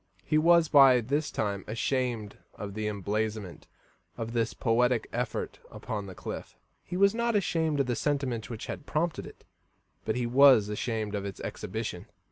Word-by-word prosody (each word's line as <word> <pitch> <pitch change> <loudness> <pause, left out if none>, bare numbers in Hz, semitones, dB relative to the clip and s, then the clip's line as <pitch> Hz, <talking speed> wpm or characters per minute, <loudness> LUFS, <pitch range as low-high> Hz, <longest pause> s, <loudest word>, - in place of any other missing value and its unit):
He 155 +1 +3
was 170 0 +5
by 135 -4 +7
this 140 +6 -1
time 100 -3 -2
ashamed 115 -2 -2 0.2
of 100 -1 -6
the 110 +1 -3
emblazonment 105 -1 -3 0.5
of 115 0 -4
his 115 -1 0
poetic 120 0 +2
effort 120 -1 -3
upon 105 -2 -5
the 95 - -9
cliff. - - -7 0.3
He 180 - -5
was 200 +1 +5
not 235 0 0
ashamed 160 -6 +1
of - - 0
the 120 -1 -1
sentiment 135 -6 -1
which 115 -3 -6
had - - -7
prompted 165 +2 -1
it, - - -14 0.6
but - - -1
he 125 -1 -1
was 125 -4 +6
ashamed 110 -1 -2
of 100 -1 -2
its 100 -2 -6
exhibition. - - -5
120 Hz, 165 wpm, -29 LUFS, 105-145 Hz, 0.6 s, by